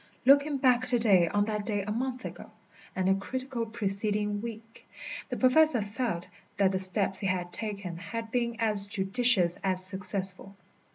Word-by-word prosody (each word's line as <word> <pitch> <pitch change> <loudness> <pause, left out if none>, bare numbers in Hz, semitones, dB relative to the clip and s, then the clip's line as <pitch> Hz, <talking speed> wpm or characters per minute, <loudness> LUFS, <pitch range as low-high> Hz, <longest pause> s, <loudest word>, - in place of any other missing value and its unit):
Looking 280 +2 +4
back 255 -1 +2
to 250 -1 +4
day 195 -7 +4
on 205 +4 0
that 210 -1 -3
day 205 -2 -2
a 210 - -5
month 255 +3 -4
ago, - - -9 0.5
and 185 0 -1
the 190 - +4
critical 245 +4 -4
preceding 210 -1 -2
week, 225 0 -10 0.4
the - - -4
Professor 265 +1 +4
felt 205 -4 -4 0.3
that 195 -1 +3
the 190 - -1
steps 190 +1 +1
he 195 - -1
had 180 -1 -3
taken 200 -6 -5
had 225 +5 -7
been 235 -1 -1
as 210 -3 +4
judicious 195 -2 +3
as 185 -1 -1
successful. 195 0 0
210 Hz, 165 wpm, -28 LUFS, 195-235 Hz, 0.5 s, Looking